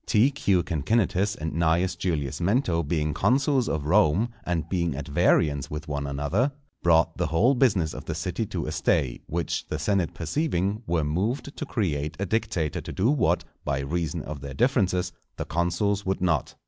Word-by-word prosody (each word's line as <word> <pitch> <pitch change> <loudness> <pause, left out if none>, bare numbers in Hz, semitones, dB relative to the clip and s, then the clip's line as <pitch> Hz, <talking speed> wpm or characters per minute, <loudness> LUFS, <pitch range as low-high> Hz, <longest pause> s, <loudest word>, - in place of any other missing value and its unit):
_ - - -42
T.Q. 105 -6 +3
CINCINNATUS 95 +4 +1
and 80 0 -4
Cn. 85 +3 +2
Julius 75 -7 -1
Mento 90 -2 +1
being 75 -1 -1
consuls 130 - +2
of 75 -2 -2
Rome, 100 +5 +3
and 85 -3 -2
being 85 -5 -1
at 70 0 -5
variance 70 0 +2
with 75 +1 -6
one 70 -1 -3
another, 75 - 0 0.3
brought 80 -1 +3
the 90 -2 0
whole 95 - +3
business 100 - +2
of - - -8
the - - -3
city - - -2
to - - -3
a 75 - -3
stay; 80 -5 0
which 85 +1 -2
the - - -3
senate 95 -4 0
perceiving, 100 - -1
were 85 -2 +1
moved 105 - -2
to 155 - -4
create 75 - -2
a 100 - 0
dictator 100 -7 -1
to - - -7
do 110 +8 +2
what, 145 - +2 0.2
by 70 - -1
reason 80 +2 -2
of 75 -2 -7
their 70 -1 -7
differences, 95 - +1 0.3
the - - -3
consuls 90 +4 0
would 95 0 -1
not. 85 -3 0
85 Hz, 180 wpm, -26 LUFS, 75-100 Hz, 0.3 s, T.Q